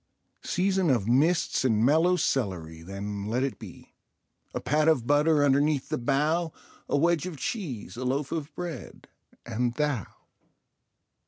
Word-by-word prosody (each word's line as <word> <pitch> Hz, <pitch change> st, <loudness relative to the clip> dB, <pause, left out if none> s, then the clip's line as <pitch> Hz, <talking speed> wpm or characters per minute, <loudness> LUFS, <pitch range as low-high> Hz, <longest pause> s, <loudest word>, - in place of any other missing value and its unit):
Season 190 Hz, -1 st, +1 dB
of 115 Hz, -7 st, +1 dB
mists 150 Hz, +9 st, +2 dB
and 115 Hz, -3 st, +3 dB
mellow 160 Hz, +6 st, +4 dB
celery, 90 Hz, -, -2 dB
then 100 Hz, +3 st, -5 dB
let 120 Hz, +4 st, 0 dB
it 135 Hz, -, -3 dB
be. -, -, -12 dB, 0.6 s
A -, -, -3 dB
pat 150 Hz, +4 st, +1 dB
of 145 Hz, -8 st, +3 dB
butter 145 Hz, +2 st, +3 dB
underneath 140 Hz, 0 st, +2 dB
the -, -, -1 dB
bough, 150 Hz, +6 st, +1 dB, 0.4 s
a -, -, +2 dB
wedge 170 Hz, +2 st, +2 dB
of 170 Hz, -5 st, -7 dB
cheese, 135 Hz, -, -4 dB
a 130 Hz, -, -4 dB
loaf 135 Hz, +2 st, -1 dB
of 155 Hz, -2 st, -3 dB
bread 170 Hz, -7 st, -7 dB, 0.4 s
and—Thou. 120 Hz, -, -1 dB
140 Hz, 140 wpm, -27 LUFS, 120-160 Hz, 0.6 s, mellow